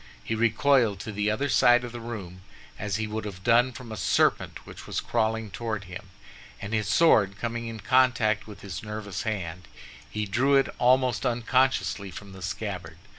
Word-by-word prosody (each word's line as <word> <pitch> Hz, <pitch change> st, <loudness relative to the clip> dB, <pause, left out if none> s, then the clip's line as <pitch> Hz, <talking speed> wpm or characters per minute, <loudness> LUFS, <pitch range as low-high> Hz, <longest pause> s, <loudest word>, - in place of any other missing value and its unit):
He -, -, -3 dB
recoiled 115 Hz, -1 st, +3 dB
to 110 Hz, -, -6 dB
the 105 Hz, +1 st, 0 dB
other 135 Hz, +7 st, 0 dB
side 120 Hz, -3 st, +5 dB
of 120 Hz, -, -6 dB
the 120 Hz, -, -7 dB
room 100 Hz, -6 st, -7 dB, 0.4 s
as 105 Hz, -2 st, -2 dB
he 110 Hz, +1 st, -1 dB
would 110 Hz, +1 st, -4 dB
have 95 Hz, -3 st, -8 dB
done 120 Hz, +3 st, +4 dB
from 125 Hz, -2 st, -10 dB
a -, -, -4 dB
serpent -, -, +1 dB
which -, -, -11 dB
was -, -, -2 dB
crawling 110 Hz, -2 st, -1 dB
toward 110 Hz, -2 st, -4 dB
him, 90 Hz, 0 st, -10 dB, 0.5 s
and 100 Hz, +2 st, -6 dB
his 110 Hz, -2 st, 0 dB
sword 110 Hz, -7 st, +4 dB
coming 115 Hz, 0 st, -3 dB
in 115 Hz, -2 st, -7 dB
contact 120 Hz, -3 st, +2 dB
with 105 Hz, -, -11 dB
his 100 Hz, 0 st, -6 dB
nervous 105 Hz, -4 st, -5 dB
hand, 90 Hz, -5 st, -4 dB, 0.4 s
he 105 Hz, 0 st, -3 dB
drew 125 Hz, +8 st, +2 dB
it 135 Hz, -, +3 dB
almost 125 Hz, -1 st, +3 dB
unconsciously 125 Hz, -4 st, +1 dB
from 100 Hz, +2 st, -10 dB
the 95 Hz, -1 st, -11 dB
scabbard. 90 Hz, -4 st, -5 dB
110 Hz, 180 wpm, -27 LUFS, 100-120 Hz, 0.5 s, side